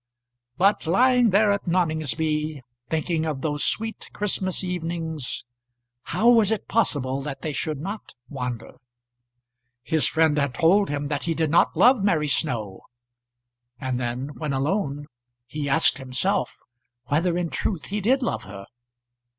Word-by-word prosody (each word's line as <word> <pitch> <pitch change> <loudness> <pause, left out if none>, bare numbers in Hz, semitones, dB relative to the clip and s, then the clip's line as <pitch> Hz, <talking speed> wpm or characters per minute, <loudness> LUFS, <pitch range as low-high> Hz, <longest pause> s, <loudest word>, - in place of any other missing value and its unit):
But, 195 -2 +2
lying 245 +6 +4
there 205 +2 +4
at 200 -1 -2
Noningsby, 155 -3 0 0.3
thinking 160 0 -1
of 145 -4 -3
those 145 -3 -1
sweet 225 0 -2
Christmas 190 -2 -1
evenings, 165 -7 -4 0.6
how 230 - 0
was 225 -4 +4
it 220 -1 -2
possible 140 - 0
that 140 -1 -6
they 155 - -2
should 150 +1 -2
not 200 +7 -7
wander? 125 -5 -6 1.1
His 155 +4 +1
friend 160 -2 +2
had 140 -3 -1
told 195 +5 +4
him 145 0 -2
that 145 -2 -2
he 165 -1 0
did 160 -2 0
not 170 - +3
love 245 -4 +5
Mary 160 -7 +2
Snow; 115 - -1 1.0
and 130 -2 -2
then, 125 +3 -3
when 150 -2 -4
alone, 145 0 -1 0.4
he 145 +3 -4
asked 140 - +4
himself 130 +3 -1 0.5
whether 170 +6 +1
in 175 -2 -2
truth 185 -7 -2
he 205 +2 -2
did 260 +6 +2
love - - -2
her. 100 0 -9
160 Hz, 140 wpm, -24 LUFS, 140-190 Hz, 1.1 s, love